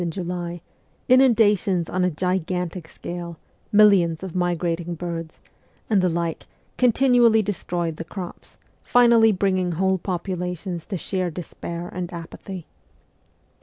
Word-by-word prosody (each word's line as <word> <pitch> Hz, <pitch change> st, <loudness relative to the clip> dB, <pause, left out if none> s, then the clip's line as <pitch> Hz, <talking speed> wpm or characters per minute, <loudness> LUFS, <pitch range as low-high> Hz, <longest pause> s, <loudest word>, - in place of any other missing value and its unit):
in 175 Hz, -, -1 dB
July, 175 Hz, -1 st, -4 dB, 0.5 s
inundations 210 Hz, -9 st, +4 dB
on 185 Hz, 0 st, -1 dB
a 180 Hz, -, +3 dB
gigantic 180 Hz, 0 st, -2 dB
scale, 170 Hz, 0 st, -7 dB, 0.3 s
millions 195 Hz, -6 st, +5 dB
of 185 Hz, -3 st, -6 dB
migrating 175 Hz, -1 st, -1 dB
birds, 165 Hz, -1 st, -6 dB, 0.5 s
and 200 Hz, -3 st, +4 dB
the 185 Hz, -, +2 dB
like 170 Hz, -1 st, -3 dB, 0.3 s
continually 245 Hz, -2 st, +4 dB
destroyed 175 Hz, -5 st, -2 dB
the -, -, -4 dB
crops, 180 Hz, +1 st, -9 dB, 0.2 s
finally 235 Hz, -2 st, +5 dB
bringing 185 Hz, -2 st, 0 dB
whole 190 Hz, +2 st, +1 dB
populations 180 Hz, -1 st, -4 dB
to 195 Hz, -, -3 dB
sheer 185 Hz, +1 st, -2 dB
despair 170 Hz, 0 st, -6 dB
and 180 Hz, 0 st, -5 dB
apathy. 175 Hz, +1 st, -8 dB
180 Hz, 120 wpm, -23 LUFS, 170-195 Hz, 0.5 s, millions